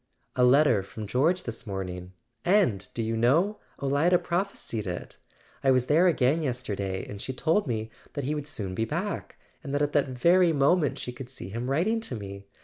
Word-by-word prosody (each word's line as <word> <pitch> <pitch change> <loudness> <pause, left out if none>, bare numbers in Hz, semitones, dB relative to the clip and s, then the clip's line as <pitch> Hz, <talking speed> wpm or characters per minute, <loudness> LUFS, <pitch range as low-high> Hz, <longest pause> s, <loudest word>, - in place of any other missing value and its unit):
"A 125 - +3
letter 125 -4 +5
from 105 +3 -8
George 150 - +1
this 115 -1 -7
morning! 90 -2 -5 0.3
And, 175 - +2
do 115 - -1
you 115 +1 -1
know, 160 - +2 0.2
Olida 145 +6 +3
prophesied 170 - -3
it? 90 -1 -5 0.5
I 135 - +4
was 130 -2 +4
there 160 +7 +4
again 150 -1 +3
yesterday; 105 -9 -3
and 100 -1 -7
she 130 - -4
told 160 +8 +1
me 110 -2 -2 0.2
that 145 - -3
he 145 +4 -1
would 150 -1 -4
soon 100 -11 -4
be 110 - -1
back, 180 - -3 0.3
and 140 -2 -3
that 145 - +1
at 145 - -1
that 145 -2 +3
very 170 +7 +4
moment 145 +1 +3
she 125 - -4
could 125 0 -9
see 125 -7 -8
him 120 +5 -4
writing 185 +12 +1
to 135 - -4
me. 100 -2 -8
130 Hz, 195 wpm, -27 LUFS, 110-160 Hz, 0.5 s, letter